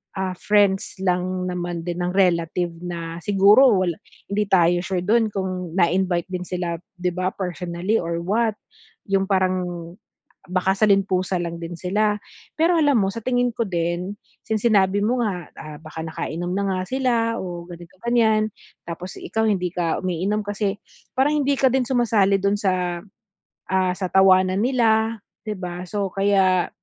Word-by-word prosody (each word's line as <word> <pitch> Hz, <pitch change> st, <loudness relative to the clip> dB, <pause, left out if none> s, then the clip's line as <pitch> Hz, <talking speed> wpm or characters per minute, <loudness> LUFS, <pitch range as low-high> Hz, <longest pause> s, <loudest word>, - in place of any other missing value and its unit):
ah, 190 Hz, -1 st, -2 dB
friends 200 Hz, -2 st, +2 dB
lang 185 Hz, 0 st, 0 dB
naman 175 Hz, -1 st, -4 dB
din 175 Hz, 0 st, -4 dB
ng 180 Hz, +1 st, -2 dB
relative 175 Hz, -2 st, +1 dB
na 170 Hz, -1 st, -6 dB
siguro 205 Hz, +6 st, +5 dB
wala 185 Hz, -3 st, +1 dB, 0.4 s
'di 210 Hz, 0 st, 0 dB
tayo 175 Hz, -2 st, +4 dB
sure 180 Hz, 0 st, -2 dB
dun 225 Hz, +3 st, +3 dB
kung 185 Hz, -3 st, -3 dB
na 170 Hz, -3 st, +3 dB
invite 180 Hz, -1 st, 0 dB
din 180 Hz, -1 st, -4 dB
sila 175 Hz, -2 st, -3 dB, 0.2 s
'di 180 Hz, 0 st, -1 dB
ba 180 Hz, +1 st, -2 dB
personally 180 Hz, +2 st, -2 dB
or 170 Hz, 0 st, -3 dB
what, 215 Hz, +4 st, +1 dB, 0.6 s
'yung 195 Hz, 0 st, +2 dB
parang, 185 Hz, -3 st, -1 dB, 0.6 s
baka 185 Hz, +1 st, +1 dB
saling-pusa 195 Hz, -3 st, +2 dB
lang 170 Hz, 0 st, -5 dB
din 170 Hz, +1 st, -6 dB
sila. 210 Hz, +4 st, 0 dB, 0.4 s
Pero 335 Hz, +2 st, +3 dB
alam 290 Hz, -3 st, +3 dB
mo 195 Hz, -, 0 dB
sa 230 Hz, -, -5 dB
tingin 245 Hz, +1 st, +1 dB
ko 230 Hz, -1 st, -2 dB
din, 175 Hz, +2 st, -2 dB, 0.3 s
since 220 Hz, -2 st, -1 dB
sinabi 205 Hz, -3 st, +3 dB
mo 245 Hz, +4 st, +1 dB
nga, 190 Hz, -8 st, -2 dB
ah, 155 Hz, -1 st, -8 dB
baka 155 Hz, 0 st, -9 dB
nakainom 175 Hz, +3 st, -4 dB
na 200 Hz, -, 0 dB
nga 185 Hz, -, -1 dB
sila 260 Hz, 0 st, +1 dB, 0.2 s
o 175 Hz, -2 st, -6 dB
ganito 175 Hz, +1 st, -12 dB
ganiyan, 220 Hz, -2 st, +2 dB, 0.4 s
tapos 175 Hz, +2 st, -7 dB
ikaw 220 Hz, +5 st, -2 dB
hindi 190 Hz, -5 st, +1 dB
ka 170 Hz, -2 st, 0 dB
umiinom 185 Hz, +4 st, -1 dB
kasi 205 Hz, 0 st, -2 dB, 0.4 s
parang 290 Hz, +2 st, +2 dB
hindi 280 Hz, -, +1 dB
ka 265 Hz, -, +5 dB
din 260 Hz, 0 st, +2 dB
sumasali 225 Hz, -6 st, +2 dB
dun 200 Hz, +1 st, +1 dB
sa, 180 Hz, -4 st, -1 dB, 0.7 s
ah, 185 Hz, -1 st, +2 dB
sa 185 Hz, -1 st, -3 dB
tawanan 185 Hz, 0 st, +5 dB
nila, 225 Hz, -2 st, +2 dB, 0.3 s
'di 210 Hz, -, -2 dB
ba, 180 Hz, -1 st, -6 dB
so 200 Hz, -1 st, -2 dB
kaya 195 Hz, -2 st, +2 dB
190 Hz, 160 wpm, -22 LUFS, 175-210 Hz, 0.7 s, siguro